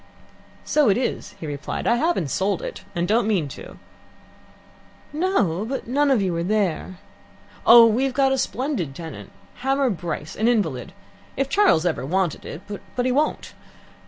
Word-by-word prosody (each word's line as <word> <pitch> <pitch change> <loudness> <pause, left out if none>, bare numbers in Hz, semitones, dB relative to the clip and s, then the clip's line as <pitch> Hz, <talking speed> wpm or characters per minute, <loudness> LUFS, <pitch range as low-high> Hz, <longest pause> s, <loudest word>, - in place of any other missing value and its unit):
"So 295 -6 +3
it 195 - +3
is," 250 - -3
he - - -6
replied. 145 -1 -5
"I 235 - +3
haven't 275 - 0
sold 190 +5 -1
it, - - -6
and 170 0 0
don't 220 +2 +2
mean 190 -9 +1
to." - - -10 1.4
"No; 295 - +1
but 265 +5 -4
none 285 +4 +1
of 250 -7 +3
you 180 -3 -1
are - - -1
there." 185 -2 -1 0.7
"Oh, 235 0 +10
we've 250 +4 +2
got 270 -1 +3
a 270 - +1
splendid 245 - -2
tenant 165 0 -9 0.3
Hamar 270 0 +1
Bryce, 165 -4 -5
an 220 - +1
invalid. 200 - 0 0.4
If 275 0 0
Charles 380 - +3
ever 170 -6 0
wanted 175 +2 -1
it 165 - -8 0.3
but 245 - 0
he 255 - +2
won't. 295 +4 -1
215 Hz, 160 wpm, -23 LUFS, 170-265 Hz, 1.4 s, Oh